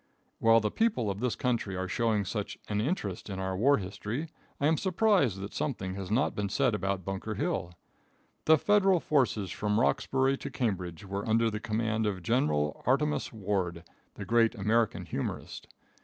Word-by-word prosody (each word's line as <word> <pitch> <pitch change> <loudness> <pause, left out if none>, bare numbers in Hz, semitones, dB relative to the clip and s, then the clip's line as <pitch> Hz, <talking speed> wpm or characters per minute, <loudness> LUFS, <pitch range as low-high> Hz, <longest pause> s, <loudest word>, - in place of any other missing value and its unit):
While 115 0 +5
the 105 - -1
people 165 - +1
of 100 - -6
this 125 0 0
country 120 -6 -1
are 95 0 -2
showing 110 -2 +1
such 105 +1 -4
an 105 0 0
interest 110 - -3
in 95 - -4
our 95 0 -2
war 135 +9 +4
history, 105 - -4 0.3
I 140 - +1
am 160 +2 +4
surprised 185 - +2
that 100 - -6
something 100 -10 -2
has 95 -1 -6
not 120 +7 +2
been 100 -1 -2
said 130 +3 +2
about 95 -2 -2
Bunker 95 -1 -4
Hill. 90 +1 -2 0.7
The 160 0 +7
Federal 195 +1 +4
forces 120 - +1
from 105 +1 0
Roxbury 135 +2 +2
to - - -5
Cambridge 95 -7 -3
were 100 +3 -4
under 115 +1 +3
command 110 -1 -1
of 95 -4 -3
General 75 - +1
Artemus 150 +4 +1
Ward, 95 -6 -2 0.3
the - - -6
great 115 0 +3
American 110 +2 +1
humorist. - - -5
110 Hz, 170 wpm, -30 LUFS, 95-130 Hz, 0.7 s, The